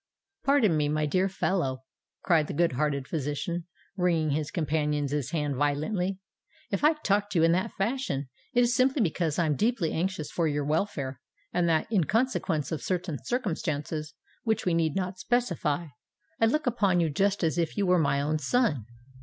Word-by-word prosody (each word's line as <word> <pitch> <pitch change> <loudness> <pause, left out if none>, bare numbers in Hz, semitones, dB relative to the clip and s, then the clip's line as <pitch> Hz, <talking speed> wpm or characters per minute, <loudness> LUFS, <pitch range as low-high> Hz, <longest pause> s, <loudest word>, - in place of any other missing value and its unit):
"Pardon 275 - +4
me, 150 -1 +1
my 155 0 +1
dear 185 +6 +1
fellow," 155 -9 -1 0.4
cried 160 -4 +3
the - - -5
good 170 +2 +3
hearted 140 0 -1
physician, 165 +3 -3 0.3
wringing 170 -5 +1
his 150 +1 -1
companion's 150 -3 -1
hand 150 -4 -1
violently. 180 +7 0 0.5
"If - - -1
I 305 +2 +6
talk 205 -9 0
to 190 - -1
you 165 - +5
in 165 - +4
that 180 +2 0
fashion, 205 - -1 0.2
it 245 -2 +3
is 240 0 +3
simply 260 -1 +3
because 165 -3 0
I 170 - +2
am 150 -2 +1
deeply 210 - +1
anxious 170 -3 -2
for 170 -2 +1
your 145 -1 -1
welfare, 145 -5 -1 0.3
and 175 -1 +2
that—in 170 +3 +2
consequence 215 - 0
of 160 - -2
certain 180 -6 -2
circumstances 155 - -2 0.3
which 220 -2 0
we 180 - +2
need 165 -2 +1
not 185 -1 -2
specify—I 175 - -2
look 305 +7 +1
upon 200 -7 +2
you 165 -3 +1
just 195 +5 +1
as 165 +1 +1
if 165 +3 -1
you 200 - +2
were 180 -1 +4
my 140 -2 +2
own 155 +2 0
son. 150 - +1
170 Hz, 175 wpm, -28 LUFS, 150-200 Hz, 0.5 s, I